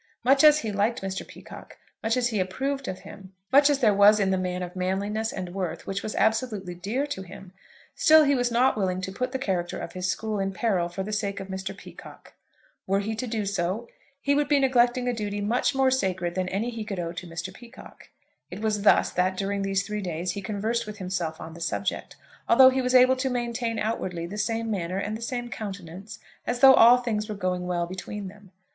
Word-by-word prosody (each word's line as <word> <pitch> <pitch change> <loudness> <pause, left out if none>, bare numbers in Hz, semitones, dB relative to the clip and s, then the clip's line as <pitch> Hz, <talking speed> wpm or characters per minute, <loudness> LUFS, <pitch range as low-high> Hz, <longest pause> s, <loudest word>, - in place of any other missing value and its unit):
Much 270 +3 +4
as 305 0 +7
he 220 - -3
liked 205 +2 0
Mr. 190 0 -3
Peacocke, - - -12 0.2
much 225 +2 0
as 245 -1 +1
he 215 -3 -1
approved 270 +9 -2
of 185 0 -5
him, 190 -1 -12 0.2
much 280 +2 +6
as 290 - +3
there 215 -4 +5
was 205 +2 +6
in 195 -1 +2
the - - +2
man 180 0 -2
of 180 +1 -7
manliness 200 +4 -1
and 180 -2 -6
worth 180 -3 -4
which 195 0 -3
was 215 - -5
absolutely 220 -5 0
dear 205 +11 -2
to 285 -9 -5
him, 185 0 -12 0.4
still 315 -1 +6
he 285 -1 +3
was 245 -2 +1
not 245 +3 +3
willing 185 -3 -1
to 185 +1 -4
put 255 +6 -3
the 265 - -2
character 185 -9 -2
of - - -6
his 185 0 -2
school 215 +1 -2
in 195 0 -1
peril 185 -5 0
for 190 +2 -4
the 215 +2 -5
sake 200 -1 -2
of 195 0 -8
Mr. 190 0 -5
Peacocke. - - -13 0.5
Were 195 +1 +2
he 215 +2 -3
to 225 +3 -4
do 220 -2 -2
so, 195 +4 -2 0.3
he 280 0 +1
would 290 0 +1
be 290 -1 +4
neglecting 250 -1 +2
a 245 - +1
duty 205 -2 -3
much 235 +6 0
more 265 -1 +3
sacred 185 -8 -1
than 185 0 -2
any 215 +6 -2
he 225 -2 -5
could 200 -3 -5
owe 170 -1 -3
to 175 +1 -7
Mr. 170 +2 -6
Peacocke. 240 +4 -14 0.4
It 180 - -7
was 215 -1 -1
thus 210 - +4
that, 185 +1 0
during 200 +1 -2
these 195 0 0
three 210 0 -4
days, 175 -1 -3
he 200 - -5
conversed 215 +3 -2
with 210 0 -7
himself 180 -4 -3
on 160 - -8
the 170 - -11
subject, 185 +3 -3 0.3
although 260 +2 +8
he 260 0 0
was 250 0 0
able 255 +1 +6
to 265 +1 -1
maintain 235 -2 -2
outwardly 190 -6 -2
the 205 +5 -6
same 225 +1 -1
manner 185 -2 -2
and 205 +2 -2
the 225 - -8
same 240 0 -4
countenance 195 0 -7 0.3
as 245 0 -2
though 270 0 +10
all 240 0 +8
things 220 -3 -2
were 210 - -3
going 180 -2 -2
well 175 -1 0
between 190 +2 -6
them. 205 0 -16
205 Hz, 230 wpm, -26 LUFS, 185-240 Hz, 0.5 s, though